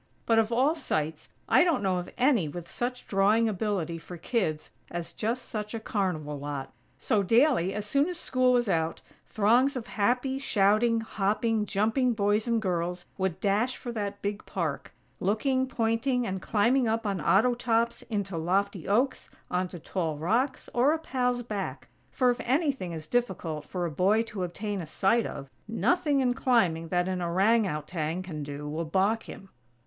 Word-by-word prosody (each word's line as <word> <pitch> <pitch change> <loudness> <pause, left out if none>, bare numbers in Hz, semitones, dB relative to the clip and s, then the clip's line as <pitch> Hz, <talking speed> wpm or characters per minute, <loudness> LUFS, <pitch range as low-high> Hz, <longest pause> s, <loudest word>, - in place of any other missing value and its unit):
But, 225 -1 +4
of 220 0 +1
all 260 +6 +3
sights, 160 - -3 0.2
I - - +6
don't 335 - +1
know 190 -2 +1
of 180 - -4
any 245 - +3
with 170 +3 -7
such 250 +1 -4
drawing 210 +4 +3
ability 190 -5 -2
for 175 +2 -9
kids 165 -5 -2 0.2
as 170 -1 -5
just 235 +4 -2
such 210 0 -4
a - - -3
carnival 170 -9 -2
lot. 140 -1 -5 0.2
So, 210 +7 +1
daily, 225 - +3
as 210 0 -3
soon 280 - +2
as 355 -1 -3
school 255 -4 +2
was 240 -2 +2
out, 165 -3 0 0.3
throngs 240 +7 +3
of 245 -3 -4
happy, 250 +5 0
shouting, 225 0 +3
hopping, 215 +1 0
jumping 225 +5 +1
boys 210 +1 +1
and 230 -1 +2
girls 180 -3 -2
would 190 -2 -1
dash 210 +6 +1
for 240 - -6
that 205 -3 -4
big 205 +1 -2
park; 160 -7 -3 0.3
looking, 260 +7 +1
pointing, 240 +1 0
and 190 -4 -3
climbing 235 +6 +2
up 225 +1 0
on 195 -4 -1
auto 215 +10 +4
tops, 235 -1 0
into 200 -5 -2
lofty 190 +2 0
oaks, 245 +7 +1 0.2
onto 180 0 -1
tall 165 -1 -3
rocks, 235 - 0
or 260 +5 +4
a - - 0
pal's 250 -6 -1
back; 210 -4 -5 0.2
for 255 -3 +3
if 240 - -4
anything 265 - 0
is 160 -2 -5
difficult 170 -9 -2
for 180 +1 -3
a 170 - -2
boy 195 +9 +3
to 210 -4 -5
obtain 200 +3 -3
a 165 - -7
sight 205 +8 +2
of, 140 - -7 0.2
nothing 285 +4 +1
in 250 -1 +2
climbing 185 -11 +2
that 175 +2 0
an 185 -1 -2
orang 195 +6 +3
outang 155 +2 -3
can 160 -5 -6
do, 145 0 -6
will 155 +3 -2
balk 195 +7 0
him! 195 - -10
210 Hz, 175 wpm, -28 LUFS, 180-240 Hz, 0.3 s, I